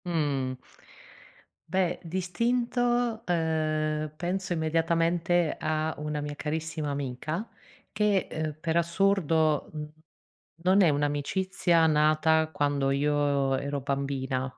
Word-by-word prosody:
Mh. 145 -6 -1 1.1
Beh, 185 -2 0
d'istinto, 235 +6 0
uhm, 155 -2 0
penso 185 +3 -3
immediatamente 165 +1 +1
a 155 0 -1
una 150 0 -3
mia 145 0 -4
carissima 155 0 -3
amica 145 - -3 0.5
che, 210 -2 +2
uhm, 155 -1 -3
per 160 0 -1
assurdo, 170 -3 +2
mhmm, 150 -1 -5 0.8
non 190 +2 +5
è 180 - +6
un'amicizia 160 +4 +1
nata 155 +1 +3
quando 145 -2 0
io 140 -1 +1
ero 140 +1 -3
bambina. 135 -1 -2
160 Hz, 100 wpm, -28 LUFS, 145-175 Hz, 1.1 s, è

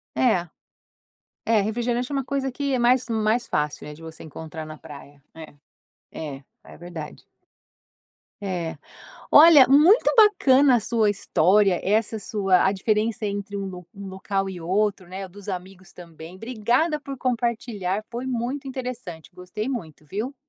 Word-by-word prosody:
É. 185 -9 +2 1.0
É, 225 -2 +3
refrigerante 240 +4 -1
é - - -3
uma 275 - -1
coisa 270 0 -2
que 280 +1 -2
é 255 - +1
mais 245 +1 +3
mais 225 +1 0
fácil, 150 0 -2
né, 150 - -8
de 155 - -16
você 160 -1 -9
encontrar 160 +1 -8
na 155 0 -10
praia. 145 0 -13
É, 160 -2 -11 0.6
é, 145 -3 -7 0.2
é - - -13
verdade. 170 -3 -9 1.2
É. 175 -5 -4 0.6
Olha, 300 -3 +9
muito 315 - +5
bacana 285 - +5
a - - 0
sua 220 -1 +1
história, 195 0 +2
essa 220 +2 0
sua 195 -3 +1
a 190 - +3
diferença 215 +2 0
entre 200 0 -4
um 195 - -3
lo 180 -2 -9
um 200 0 -9
local 195 +1 -3
e 180 -2 -7
outro, 190 +1 -1
né, 190 +1 -6
dos 200 +2 -13
amigos 185 0 -7
também, 170 0 -12
obrigada 245 - 0
por 275 -1 -7
compartilhar, 230 -5 -2
foi 245 +2 -5
muito 260 +3 -3
interessante. 250 - -6
Gostei 180 +6 -6
muito, 160 - -6
viu. 215 - -4
205 Hz, 150 wpm, -24 LUFS, 180-245 Hz, 1.2 s, Olha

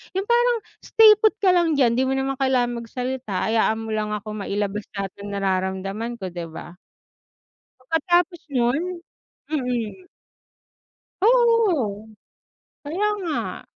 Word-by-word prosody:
yung 385 - 0
parang, 480 0 +3 0.2
"Stay 445 -2 +6
put 435 -1 +3
ka 370 -3 +4
lang 340 -2 +3
diyan 240 -4 +3
'di 260 - +2
mo - - 0
naman 270 0 -1
kailangan 245 -3 +1
magsalita 250 -3 -3
hayaan 220 0 +2
mo 225 0 -5
lang 210 0 -2
akong 210 0 -6
mailabas 205 +1 -2
lahat 195 -1 -3
ng - - -6
nararamdaman 195 +4 -2
ko", 190 - -4
'di 170 -1 -6
ba? 170 +2 -9 1.1
Pagkatapos 345 +2 +1
nun 280 +9 0 0.5
mm. 250 - -3 1.2
Oo, 405 - +3 0.7
kaya 350 +9 -1
nga. 325 -5 -3
250 Hz, 125 wpm, -23 LUFS, 210-350 Hz, 1.2 s, Stay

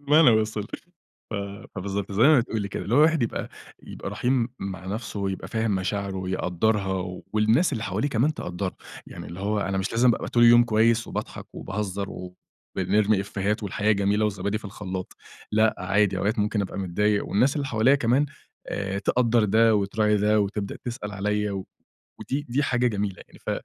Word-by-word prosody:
المعنى 145 -1 +6
وصل، 110 -1 +1 0.7
ف - - -4 0.4
فبالضبط 100 +1 -3
زي 105 - +2
ما 150 0 +7
بتقولي 110 -4 -3
كده، - - -4
اللي 110 - 0
هو 140 - +5
الواحد 160 -2 +5
يبقى 115 - -2 0.3
يبقى - - -7
رحيم 125 -1 +1
مع 95 -1 -6
نَفْسه 105 0 -4
ويبقى 95 -1 -3
فاهم 110 -3 0
مشاعره 95 +1 -2
ويقدَّرها، 95 0 -1
والناس 110 +11 +3
اللي 115 -4 -2
حواليه 105 +9 -1
كمان 140 +5 +1
تقدَّرها، 90 +1 -4 0.3
يعني - - -9
اللي 90 +3 -8
هو 105 +1 0
أنا 95 0 -1
مش 95 - -2
لازم 120 +2 +4
ابقى - - -5
طول 120 - +2
اليوم 120 0 +8
كويس 115 +1 +2
وباضحك - - -5
وباهزر 100 -1 -3 0.7
وبنرمي 100 +3 +2
إيفيهات 100 +2 -2
والحياة 105 +2 +1
جميلة 100 +1 +1
وزبادي 100 +1 -1
في - - -18
الخلاط، 95 -2 -6 0.4
لأ 110 +1 +4
عادي 100 0 +1
أوقات 105 +2 0
ممكن 105 0 +1
أبقى 95 - -5
متضايق 100 +3 0
والناس 130 +8 +2
اللي 140 - -1
حواليَّ 125 +2 +3
كمان 130 +4 +2 0.4
آآ، 100 0 -2
تقدَّر 120 0 +2
ده 110 +2 +4
وتراعي 105 +1 +2
ده 105 +1 +3
وتبدأ 100 0 -2
تسأل 110 -4 -5
عليَّ، 105 +1 -1 0.7
ودي 145 +2 -3
دي 135 +5 +1
حاجة 125 -2 +1
جميلة 100 -4 -2
يعني، - - -17
ف - - -5
105 Hz, 175 wpm, -25 LUFS, 100-115 Hz, 0.7 s, اليوم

